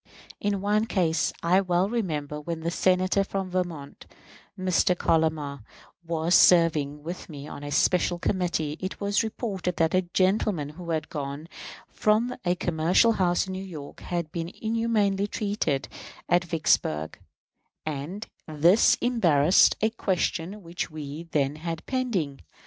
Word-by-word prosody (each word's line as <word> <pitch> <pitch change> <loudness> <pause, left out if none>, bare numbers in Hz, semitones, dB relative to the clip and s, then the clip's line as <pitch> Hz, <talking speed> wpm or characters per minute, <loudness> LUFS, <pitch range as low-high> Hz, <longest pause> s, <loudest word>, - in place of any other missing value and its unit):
In 200 -1 -1
one 210 +2 +1
case, 175 -6 +1
I 180 +3 +4
well 180 0 +1
remember 150 -10 -3
when 165 +1 -5
the 170 +1 -2
Senator 185 +2 +2
from 195 -1 -4
Vermont 170 -6 -4 0.5
[Mr. 185 0 +2
Collamer] 155 -5 0 0.4
was 165 0 -1
serving 155 -6 +4
with 175 +3 -7
me 145 -2 -8
on 145 - -8
a 145 - -5
special 175 +3 +2
committee, 170 -5 -1
it 185 +1 -5
was 200 0 +1
reported 205 -5 -3
that 165 -1 +1
a 185 - +4
gentleman 185 -3 0
who 170 +3 -9
had 160 -1 -1
gone 145 +1 -5 0.4
from 225 +4 +1
a 175 -1 +1
commercial 175 +6 +3
house 180 -5 +1
in 190 - -6
New 190 +1 -5
York 155 -7 -9
had 170 -3 -4
been 165 -1 -4
inhumanly 220 -3 +1
treated 200 - -1 0.4
at 175 +1 +3
Vicksburg, 80 - 0 0.7
and 155 +8 -4 0.2
this 165 +7 +4
embarrassed 180 - +4
a 220 +1 +2
question 190 -1 -2
which 170 +1 -4
we 155 +1 -7
then 145 -1 0
had 165 0 -5
pending. 195 - -2
175 Hz, 140 wpm, -26 LUFS, 155-195 Hz, 0.7 s, I